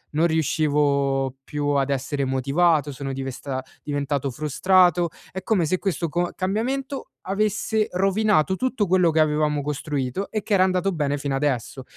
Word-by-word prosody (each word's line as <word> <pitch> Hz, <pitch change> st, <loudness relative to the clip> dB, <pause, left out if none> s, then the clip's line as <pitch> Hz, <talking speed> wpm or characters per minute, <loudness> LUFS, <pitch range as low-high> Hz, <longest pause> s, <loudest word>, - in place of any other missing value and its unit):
non 165 Hz, +3 st, +4 dB
riuscivo 140 Hz, -4 st, +1 dB
più 145 Hz, 0 st, -4 dB
ad 140 Hz, -1 st, +1 dB
essere 140 Hz, +1 st, -1 dB
motivato, 145 Hz, +4 st, +2 dB
sono 135 Hz, +1 st, -5 dB
divesta 135 Hz, 0 st, -4 dB, 0.2 s
diventato 145 Hz, -2 st, -2 dB
frustrato, 175 Hz, +5 st, +3 dB, 0.2 s
è 190 Hz, 0 st, -6 dB
come 195 Hz, -6 st, +2 dB
se 185 Hz, +4 st, +1 dB
questo 180 Hz, -3 st, -1 dB
co 175 Hz, +3 st, -1 dB
cambiamento 260 Hz, +8 st, -2 dB, 0.2 s
avesse 215 Hz, +2 st, 0 dB
rovinato 190 Hz, -1 st, +2 dB
tutto 245 Hz, -3 st, -1 dB
quello 180 Hz, -2 st, +4 dB
che 160 Hz, -, +1 dB
avevamo 150 Hz, -1 st, +2 dB
costruito 145 Hz, +3 st, -3 dB
e 215 Hz, -, -1 dB
che 215 Hz, -, -2 dB
era 190 Hz, -2 st, +5 dB
andato 185 Hz, +1 st, +1 dB
bene 145 Hz, -2 st, -1 dB
fino 140 Hz, -1 st, -2 dB
adesso. 135 Hz, -2 st, -2 dB
155 Hz, 150 wpm, -23 LUFS, 140-190 Hz, 0.2 s, era